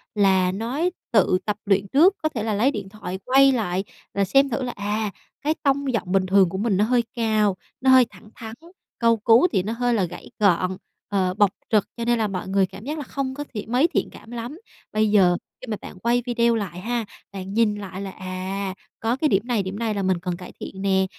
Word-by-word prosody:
là 190 Hz, -3 st, +3 dB
nói 245 Hz, -, -1 dB, 0.2 s
tự 195 Hz, -4 st, +4 dB
tập 210 Hz, -1 st, -1 dB
luyện 200 Hz, -1 st, +2 dB
trước, 340 Hz, -, +5 dB
có 310 Hz, -, +2 dB
thể 230 Hz, -8 st, -4 dB
là 220 Hz, -1 st, -1 dB
lấy 230 Hz, +7 st, +3 dB
điện 200 Hz, -7 st, -6 dB
thoại 190 Hz, -2 st, -6 dB
quay 270 Hz, +1 st, +6 dB
lại 195 Hz, -7 st, -1 dB, 0.3 s
là 200 Hz, 0 st, +1 dB
xem 275 Hz, +7 st, +4 dB
thử 250 Hz, +3 st, -2 dB
là 250 Hz, -, -2 dB
"À, 210 Hz, +1 st, -2 dB, 0.3 s
cái 300 Hz, +2 st, +1 dB
tông 275 Hz, -2 st, +1 dB
giọng 190 Hz, -5 st, -2 dB
bình 195 Hz, -1 st, +3 dB
thường 190 Hz, -1 st, +4 dB
của 190 Hz, -, -4 dB
mình 205 Hz, -1 st, +1 dB
nó 205 Hz, -, +3 dB
hơi 240 Hz, +1 st, +2 dB
cao, 215 Hz, -4 st, +2 dB, 0.3 s
nó 265 Hz, -, +3 dB
hơi 260 Hz, -1 st, +8 dB
thẳng 210 Hz, +1 st, -16 dB
thắn, 225 Hz, -2 st, -8 dB, 0.4 s
câu 230 Hz, -1 st, +4 dB
cú 230 Hz, +8 st, +5 dB
thì 185 Hz, -, +1 dB
nó 215 Hz, +4 st, -2 dB
hơi 245 Hz, +1 st, 0 dB
là 210 Hz, -4 st, +2 dB
gãy 175 Hz, 0 st, -6 dB
gọn, 185 Hz, -2 st, +2 dB, 0.3 s
ờ, 190 Hz, -3 st, +1 dB
bộc 205 Hz, 0 st, +4 dB, 0.2 s
trực, 210 Hz, -3 st, +3 dB
cho 235 Hz, -, -3 dB
nên 240 Hz, 0 st, +2 dB
là 220 Hz, -, +1 dB
mọi 190 Hz, -2 st, -4 dB
người 195 Hz, 0 st, +3 dB
cảm 195 Hz, +2 st, -11 dB
giác 300 Hz, +3 st, -3 dB
là 295 Hz, -, -4 dB
không 265 Hz, 0 st, -3 dB
có 290 Hz, +2 st, -5 dB
thiện 220 Hz, 0 st, -6 dB
mấy 265 Hz, +7 st, +4 dB
thiện -, -, -1 dB
cảm 225 Hz, -, -13 dB
lắm." 240 Hz, +7 st, -6 dB, 0.3 s
Bây 215 Hz, 0 st, +2 dB
giờ 180 Hz, -4 st, +5 dB, 0.2 s
khi 255 Hz, -, -9 dB
mà 215 Hz, -2 st, -2 dB
bạn 180 Hz, -, -10 dB
quay 240 Hz, +3 st, +2 dB
video 235 Hz, -1 st, +2 dB
lại 190 Hz, -5 st, -4 dB
ha, 235 Hz, +3 st, -2 dB, 0.3 s
bạn 195 Hz, 0 st, -6 dB
nhìn 220 Hz, -1 st, +3 dB
lại 195 Hz, -2 st, -7 dB
là 200 Hz, -, -4 dB
"À, 185 Hz, +1 st, -4 dB, 0.3 s
có 225 Hz, +2 st, 0 dB
cái 305 Hz, +4 st, +1 dB
điểm 195 Hz, +2 st, +1 dB
này 235 Hz, -5 st, +1 dB
điểm 190 Hz, +3 st, -5 dB
này 225 Hz, -2 st, 0 dB
là 200 Hz, -1 st, -2 dB
mình 185 Hz, -2 st, +1 dB
cần 175 Hz, -1 st, -3 dB
cải 180 Hz, -, -10 dB
thiện 190 Hz, -, -7 dB
nè" 190 Hz, -1 st, +2 dB
210 Hz, 240 wpm, -23 LUFS, 190-240 Hz, 0.4 s, hơi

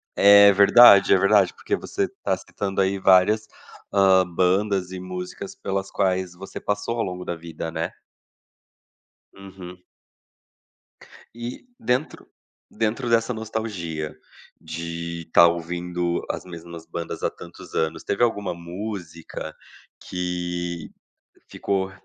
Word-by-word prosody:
É, 100 Hz, 0 st, +8 dB
verdade, 100 Hz, +1 st, +7 dB
é -, -, +6 dB
verdade, 100 Hz, 0 st, +4 dB
porque -, -, -2 dB
você -, -, -2 dB
está -, -, -3 dB
citando, 95 Hz, -1 st, -3 dB
aí, 95 Hz, +1 st, +1 dB
várias, 95 Hz, +3 st, +4 dB, 0.5 s
hã, 95 Hz, -1 st, +5 dB
bandas 95 Hz, +2 st, +1 dB
e 95 Hz, -, -6 dB
músicas 90 Hz, 0 st, -7 dB
pelas 95 Hz, 0 st, -3 dB
quais 95 Hz, -2 st, 0 dB
você 95 Hz, +2 st, -9 dB
passou 105 Hz, +3 st, -2 dB
ao 115 Hz, -, +1 dB
longo 90 Hz, 0 st, -5 dB
da 85 Hz, -, -3 dB
vida, 80 Hz, -1 st, -7 dB
né. -, -, -3 dB, 1.4 s
Uhum. 95 Hz, -2 st, -11 dB, 1.6 s
E 120 Hz, -, -7 dB
dentro 125 Hz, +5 st, -2 dB, 0.4 s
dentro 115 Hz, +3 st, -2 dB
dessa 115 Hz, +1 st, +2 dB
nostalgia, 105 Hz, -9 st, -4 dB, 0.5 s
de 85 Hz, +1 st, -5 dB
estar 85 Hz, +1 st, +7 dB
ouvindo 85 Hz, +1 st, -2 dB
as -, -, -3 dB
mesmas 85 Hz, -2 st, -10 dB
bandas 85 Hz, 0 st, -6 dB
há -, -, +2 dB
tantos -, -, -13 dB
anos, 80 Hz, 0 st, -1 dB
teve 100 Hz, -, -2 dB
alguma 105 Hz, -5 st, -2 dB
música 85 Hz, -1 st, -7 dB, 0.5 s
que 90 Hz, -1 st, -4 dB, 0.6 s
ficou 95 Hz, -1 st, -2 dB
95 Hz, 115 wpm, -23 LUFS, 85-100 Hz, 1.6 s, É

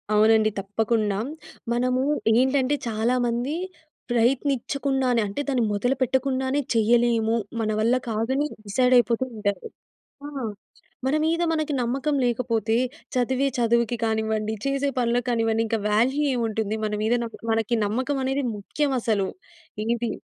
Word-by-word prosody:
అవునండి. 220 Hz, 0 st, +5 dB
తప్పకుండా. 210 Hz, 0 st, 0 dB, 0.5 s
మనము 250 Hz, +1 st, +1 dB, 0.3 s
ఏంటంటే 260 Hz, +3 st, +3 dB
చాలా 225 Hz, +3 st, +1 dB
మంది 240 Hz, +5 st, -1 dB, 0.6 s
ప్రయత్నిచ్చకుండానే 265 Hz, +1 st, +1 dB
అంటే 200 Hz, +8 st, -3 dB
దాన్ని 260 Hz, -4 st, +1 dB
మొదలుపెట్టకుండానే 260 Hz, +4 st, 0 dB
చేయలేము 230 Hz, 0 st, +3 dB, 0.2 s
మన 215 Hz, -1 st, 0 dB
వల్ల 235 Hz, +3 st, +3 dB
కాదని 245 Hz, +7 st, 0 dB, 0.2 s
డిసైడయిపోతూ 245 Hz, +2 st, +3 dB
ఉంటారు. 205 Hz, -3 st, -2 dB, 0.6 s
ఆ! -, -, -6 dB, 0.8 s
మన 270 Hz, +3 st, +2 dB
మీద 330 Hz, +2 st, +1 dB
మనకి 310 Hz, -2 st, -1 dB
నమ్మకం 275 Hz, +5 st, 0 dB
లేకపోతే 230 Hz, -2 st, 0 dB, 0.4 s
చదివే 260 Hz, +2 st, +1 dB
చదువుకి 235 Hz, 0 st, +2 dB
కానివ్వండి, 220 Hz, -1 st, 0 dB
చేసే 275 Hz, 0 st, +1 dB
పనులకి 245 Hz, 0 st, +1 dB
కానివండి 225 Hz, -1 st, +1 dB
ఇంకా 225 Hz, -, 0 dB
వాల్యూ 255 Hz, +8 st, +2 dB
ఏముంటుంది? 220 Hz, -3 st, -1 dB
మన 210 Hz, -, -2 dB
మీద 220 Hz, +2 st, +2 dB
నాకు 230 Hz, -, -7 dB
మనకి 225 Hz, +1 st, +1 dB
నమ్మకం 255 Hz, +7 st, -1 dB
అనేది 270 Hz, +2 st, 0 dB
ముఖ్యమసలు. 225 Hz, -4 st, 0 dB, 0.6 s
ఏది 235 Hz, 0 st, 0 dB
240 Hz, 115 wpm, -24 LUFS, 220-265 Hz, 0.8 s, అవునండి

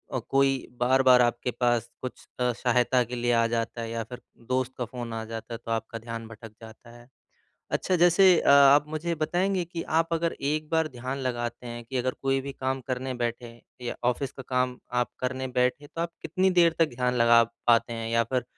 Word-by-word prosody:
अ, -, -, +1 dB
कोई 135 Hz, -1 st, +2 dB
बार-बार 130 Hz, 0 st, +5 dB
आपके 120 Hz, +1 st, 0 dB
पास 120 Hz, -1 st, 0 dB
कुछ 130 Hz, -, -7 dB
अ, 125 Hz, 0 st, +2 dB
सहायता 125 Hz, +1 st, +2 dB
के 120 Hz, +1 st, -6 dB
लिए 120 Hz, 0 st, 0 dB
आ 115 Hz, 0 st, +3 dB
जाता 115 Hz, 0 st, -2 dB
है 115 Hz, -, -5 dB
या 115 Hz, 0 st, -3 dB
फिर 125 Hz, +3 st, -10 dB, 0.3 s
दोस्त 130 Hz, 0 st, 0 dB
का 125 Hz, -, -2 dB
फ़ोन 120 Hz, 0 st, -7 dB
आ 110 Hz, 0 st, -4 dB
जाता 115 Hz, +1 st, -7 dB
है -, -, -4 dB
तो 115 Hz, -, -4 dB
आपका 115 Hz, 0 st, -3 dB
ध्यान 115 Hz, 0 st, -7 dB
भटक 110 Hz, 0 st, -11 dB
जाता 110 Hz, +1 st, -13 dB
है। 120 Hz, 0 st, -17 dB, 0.6 s
अच्छा 185 Hz, -, 0 dB
जैसे 175 Hz, +1 st, +5 dB
अ, -, -, +1 dB
आप 140 Hz, +1 st, +7 dB
मुझे 160 Hz, +2 st, -2 dB
बताएँगे 180 Hz, +4 st, 0 dB
कि 170 Hz, 0 st, -6 dB, 0.2 s
आप 165 Hz, 0 st, -5 dB
अगर 165 Hz, 0 st, 0 dB, 0.2 s
एक 155 Hz, 0 st, -2 dB
बार 160 Hz, -1 st, +1 dB
ध्यान 130 Hz, 0 st, -5 dB
लगाते 120 Hz, -1 st, -3 dB
हैं 120 Hz, 0 st, -7 dB
कि 130 Hz, +3 st, -4 dB
अगर 130 Hz, +1 st, 0 dB
कोई 135 Hz, 0 st, +1 dB
भी 140 Hz, +1 st, -6 dB
काम 130 Hz, 0 st, -3 dB
करने 130 Hz, 0 st, -3 dB
बैठे 120 Hz, 0 st, -3 dB
हैँ 115 Hz, 0 st, -15 dB, 0.2 s
या 120 Hz, -, -4 dB
ऑफ़िस 130 Hz, +2 st, -3 dB
का 135 Hz, -, -10 dB
काम 125 Hz, -1 st, 0 dB, 0.2 s
आप 120 Hz, -, -2 dB
करने 130 Hz, +1 st, -2 dB
बैठे 125 Hz, +4 st, +1 dB
तो 165 Hz, -, -6 dB
आप 170 Hz, 0 st, -2 dB
कितनी 185 Hz, +4 st, +1 dB
देर 170 Hz, -1 st, +4 dB
तक 165 Hz, -2 st, +4 dB
ध्यान 125 Hz, 0 st, 0 dB
लगा 115 Hz, -1 st, +6 dB, 0.2 s
पाते 120 Hz, 0 st, +4 dB
हैं? 115 Hz, 0 st, -4 dB
या 115 Hz, 0 st, +3 dB
फिर 125 Hz, 0 st, -1 dB
125 Hz, 215 wpm, -27 LUFS, 120-140 Hz, 0.6 s, आप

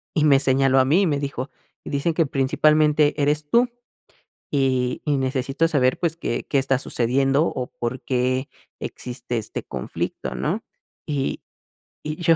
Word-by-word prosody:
y 155 Hz, -, +3 dB
me 140 Hz, -2 st, +5 dB
señaló 135 Hz, 0 st, +4 dB
a -, -, +5 dB
mí 165 Hz, +9 st, +3 dB
y -, -, +3 dB
me 145 Hz, -3 st, +1 dB
dijo: 140 Hz, -1 st, -4 dB, 0.3 s
"Dicen 145 Hz, +4 st, -1 dB
que 165 Hz, -3 st, +2 dB
principalmente 150 Hz, +2 st, +3 dB
eres 150 Hz, +1 st, +1 dB
tú, 240 Hz, +5 st, +4 dB, 0.8 s
y 130 Hz, -3 st, 0 dB
y 150 Hz, -2 st, +1 dB
necesito 135 Hz, +4 st, 0 dB
saber, 130 Hz, -5 st, +2 dB
pues, 165 Hz, -2 st, -1 dB
¿qué 120 Hz, -7 st, -3 dB
qué 140 Hz, -, +2 dB
está 135 Hz, -1 st, +2 dB
sucediendo 135 Hz, +5 st, +1 dB
o 125 Hz, -, -3 dB
por 120 Hz, +2 st, -4 dB
qué 130 Hz, +2 st, 0 dB, 0.3 s
existe 120 Hz, -1 st, -4 dB
este 110 Hz, -, -4 dB
conflicto?", 65 Hz, -1 st, -4 dB
¿no?, -, -, -2 dB, 0.4 s
y 140 Hz, -3 st, -2 dB, 0.6 s
y 155 Hz, +2 st, -4 dB
yo 165 Hz, -2 st, +4 dB
135 Hz, 155 wpm, -23 LUFS, 130-150 Hz, 0.8 s, me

